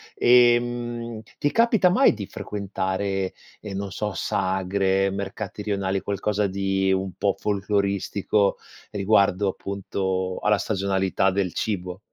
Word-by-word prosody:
ehm, 120 -1 +3 0.2
ti 145 - 0
capita 225 -5 +4
mai 255 +10 +5
di 105 -4 -6
frequentare, 95 -1 -3 0.3
ehm, 105 -2 -7
non 100 0 -4
so, 105 +1 -3
sagre, 95 +1 0
mercati 100 +1 -5
rionali, 100 -2 -1
qualcosa 100 +1 -1
di 95 0 0
un 95 0 -1
po' 100 -1 +1
folcloristico 100 0 0 0.3
riguardo 100 -1 +2
appunto 95 -1 -3
alla 105 0 +3
stagionalità 95 -2 0
del 95 -2 0
cibo? 90 -3 -3
100 Hz, 115 wpm, -24 LUFS, 95-105 Hz, 0.3 s, mai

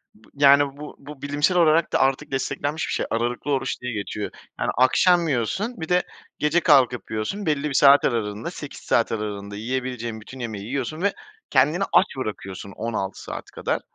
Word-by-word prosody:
Bı 110 - -22
yani, 140 0 +5
bu 150 0 -9
bu 140 0 -11
bilimsel 145 +5 +1
olarak 165 -1 +4
da - - +3
artık 135 0 +1
desteklenmiş 145 +3 -2
bir - - -2
şey, - - -1
aralıklı 120 +5 -1
oruç 135 -2 -1
diye 125 -1 -4
geçiyor. 105 0 -4 0.3
Yani - - 0
akşam 170 +7 +4
yiyorsun, 150 - -1
bir 160 - -5
de 180 0 +3 0.4
gece 150 +3 +3
kalkıp 130 -7 +3
yiyorsun, 110 - -3
belli 150 -1 0
bir 135 - -4
saat 140 +1 +6
aralığında, 110 -3 -2
8 - - -8
saat - - +1
aralığında 100 -2 -4
yiyebileceğin 120 0 -4
bütün 130 +5 -11
yemeği 110 -4 -5
yiyorsun 135 +6 -3
ve 200 +1 +2 0.4
kendini 150 +8 +3
aç - - +6
bırakıyorsun 100 -5 -5
16 105 -4 -4
saat - - -6
kadar. - - -2
130 Hz, 175 wpm, -24 LUFS, 115-150 Hz, 0.4 s, saat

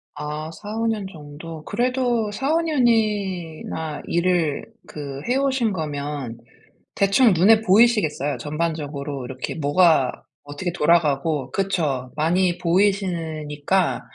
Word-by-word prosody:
아 150 +1 -5
4-5 215 +6 -4
년 215 -3 -1
정도. 155 0 -10
그래도 245 -3 0
4-5 290 +9 0
년이나 200 - -1
일을 170 -4 +1 0.2
그 140 -2 -7
해 255 - +2
오신 265 -5 +1
거면 145 -6 -4 0.6
대충 200 +3 +4
눈에 215 +6 +5
보이시겠어요. 200 - +3
전반적으로 150 -3 -3
이렇게 130 +1 -5
뭐가 155 -2 +3 0.3
어떻게 145 +5 -4
돌아가고 150 -4 +1
그쵸 150 -10 -1
많이 175 +3 +1
보이시니까 175 -3 0
170 Hz, 230 characters per minute, -22 LUFS, 150-205 Hz, 0.6 s, 눈에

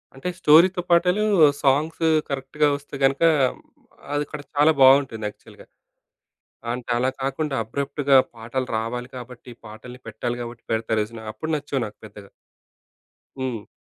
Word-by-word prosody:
అంటే 135 +6 -7
స్టోరీ‌తో 180 +4 +5
పాటలు, 180 +4 +3 0.4
సాంగ్సు 155 +4 +1 0.2
కరెక్ట్‌గా 140 +2 0
ఒస్తే 145 0 -12
గనుక, 135 +3 +2 0.9
అది 145 0 0
అక్కడ 150 - -7
చాలా 150 +2 +5
బావుంటుంది 130 -5 +5
యాక్చువల్‌గా. - - -17 1.1
అంటే 125 0 -6
అలా 130 +2 +1
కాకుండా 140 +2 -2
అబ్రప్ట్‌గా 140 +3 +1 0.2
పాటలు 120 +3 -4
రావాలి 120 +2 -4
కాబట్టి, 125 0 -10 0.2
పాటల్ని 120 +4 -11
పెట్టాలి 120 +2 -4
గాబట్టి, 120 0 -9
పెడతారు 110 0 0
చూసినవా? 110 0 -11
అప్పుడు 160 0 -4
నచ్చవు 145 -3 -3
నాకు 105 - -12
పెద్దగా. 100 -1 -14 1.1
హ్మ్. 125 -5 -4
130 Hz, 125 wpm, -23 LUFS, 115-145 Hz, 1.1 s, స్టోరీ‌తో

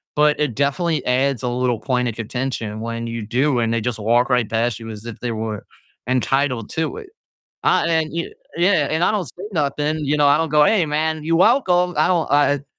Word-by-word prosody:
but 150 0 +3
it 145 -7 -1
definitely 150 +5 0
adds 130 0 +1
a 125 - 0
little 125 -1 0
point 125 +1 0
of 110 - -6
contention 115 -2 -4
when 115 0 -4
you 115 -1 -4
do, 130 +4 +1
and 115 -1 0
they 115 - 0
just 115 0 -3
walk 120 +4 +2
right 125 -4 +1
past 115 0 0
you 115 -1 -8
as 110 0 -9
if 115 -3 -8
they 120 - -3
were 110 -2 -4 0.4
entitled 130 -2 0
to 160 - -2
it. 435 -3 -10 0.6
Ah, - - +4
and 170 - 0
then 160 -1 0
you 170 0 -3 0.2
Yeah, 170 -4 +3
and 160 +3 +1
I - - +3
don't 200 -5 -1
say 175 +9 -10
nothing, 150 -1 -1
you 145 +1 +1
know, 145 -1 +3
I 140 +1 +5
don't 165 0 0
go, 150 0 +4
"Hey, 200 0 +3
man, 155 +1 -1
you 165 +1 +1
welcome." 180 -4 +3
I - - +3
don't, 175 -3 +1
uh, 145 0 +4
it - - -22
140 Hz, 230 wpm, -20 LUFS, 120-160 Hz, 0.6 s, I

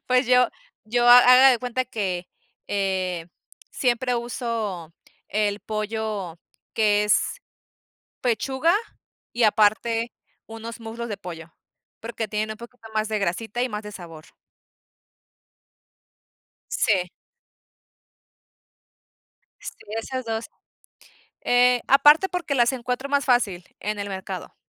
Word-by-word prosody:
Pues 255 0 +2
yo 250 -1 +5 0.4
yo 240 +2 +2
Ha 245 - +11
haga 255 +2 +8
de 245 - +2
cuenta 250 +1 -2
que, 190 -7 -3 0.4
eh, 185 -4 -2 0.4
siempre 250 0 0
uso 225 -8 -4 0.4
el 210 0 0
pollo, 215 -5 -4 0.4
que 210 -1 +3
es - - +1 0.8
pechuga, 265 - +1 0.6
y 235 -1 +1
aparte, 225 +2 +2 0.3
unos 225 +1 -8
muslos 230 +1 -6
de 205 - -4
pollo, 170 -4 -9 0.5
porque 225 -1 -4
tienen 215 +1 -2
un - - -10
poquito 235 0 -13
más 215 0 0
de 215 - -1
grasita, 220 +6 -2
y 255 - 0
más 210 -2 -5
de 210 - -8
sabor. 165 -5 -11 2.5
Sí. 200 - +1 2.5
Sí, - - -8 0.2
esas 255 +3 -4
2 225 0 -4 1.0
Eh, 245 0 +4
aparte, 295 +7 +6
porque 340 -4 -2
las 240 -2 +3
encuentro 255 +2 -4
más 285 0 +1
fácil, 205 -9 +1
en 210 0 -3
el 200 0 -4
mercado, 190 -1 -6
225 Hz, 115 wpm, -24 LUFS, 205-250 Hz, 2.5 s, Ha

